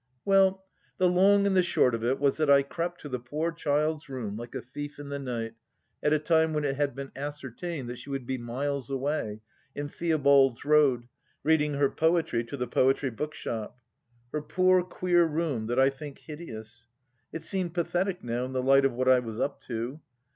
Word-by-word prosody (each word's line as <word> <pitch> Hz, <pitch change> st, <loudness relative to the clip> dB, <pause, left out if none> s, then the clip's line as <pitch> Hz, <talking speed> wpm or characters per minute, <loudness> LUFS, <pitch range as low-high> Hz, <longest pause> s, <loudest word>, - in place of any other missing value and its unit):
Well, 195 Hz, -1 st, +4 dB, 0.3 s
the 185 Hz, -, +4 dB
long 195 Hz, +3 st, +5 dB
and 200 Hz, -1 st, +2 dB
the 185 Hz, -, +6 dB
short 130 Hz, -8 st, +2 dB
of 115 Hz, 0 st, -2 dB
it 130 Hz, +3 st, +1 dB
was 140 Hz, -1 st, +2 dB
that 155 Hz, -2 st, +1 dB
I 140 Hz, 0 st, +7 dB
crept 170 Hz, +5 st, -4 dB
to 145 Hz, -, -7 dB
the 125 Hz, -1 st, -3 dB
poor 150 Hz, +8 st, -2 dB
child's 150 Hz, -1 st, -1 dB
room 120 Hz, -7 st, -4 dB
like 120 Hz, +2 st, -8 dB
a -, -, -3 dB
thief 145 Hz, +3 st, -7 dB
in 145 Hz, -1 st, -8 dB
the 140 Hz, 0 st, -3 dB
night, 115 Hz, -4 st, -4 dB, 0.5 s
at 150 Hz, -, +2 dB
a 155 Hz, -, +5 dB
time 160 Hz, +1 st, +2 dB
when 150 Hz, -1 st, 0 dB
it 135 Hz, -2 st, 0 dB
had 145 Hz, 0 st, -1 dB
been 135 Hz, 0 st, -6 dB
ascertained 145 Hz, +1 st, -5 dB
that 120 Hz, 0 st, -6 dB
she -, -, -11 dB
would 135 Hz, -2 st, -3 dB
be 130 Hz, +1 st, -3 dB
miles 135 Hz, +3 st, -3 dB
away, 135 Hz, -6 st, -2 dB, 0.3 s
in 145 Hz, 0 st, -4 dB
Theobald's 140 Hz, -7 st, +3 dB
Road, 145 Hz, -5 st, +4 dB, 0.4 s
reading 150 Hz, -1 st, +2 dB
her 140 Hz, 0 st, +3 dB
poetry 160 Hz, -7 st, +1 dB
to 130 Hz, +4 st, -6 dB
the 125 Hz, -, -1 dB
Poetry 130 Hz, +2 st, +2 dB
Bookshop. 115 Hz, -3 st, -5 dB, 0.5 s
Her 150 Hz, -, -2 dB
poor 185 Hz, +3 st, +3 dB
queer 180 Hz, -1 st, +2 dB
room, 150 Hz, -8 st, -1 dB
that 120 Hz, +2 st, -1 dB
I 135 Hz, +1 st, +5 dB
think 140 Hz, +1 st, -9 dB
hideous! 120 Hz, -6 st, -9 dB, 0.4 s
It 165 Hz, 0 st, -6 dB
seemed 185 Hz, -1 st, -2 dB
pathetic 180 Hz, +2 st, -1 dB
now 120 Hz, +1 st, -2 dB
in 130 Hz, -, -7 dB
the 130 Hz, -1 st, -1 dB
light 135 Hz, +1 st, +5 dB
of 135 Hz, -, +2 dB
what 130 Hz, +2 st, -1 dB
I 130 Hz, -1 st, +6 dB
was 115 Hz, -2 st, -6 dB
up 140 Hz, -, -2 dB
to. 120 Hz, +4 st, -4 dB
140 Hz, 200 wpm, -28 LUFS, 125-160 Hz, 0.5 s, I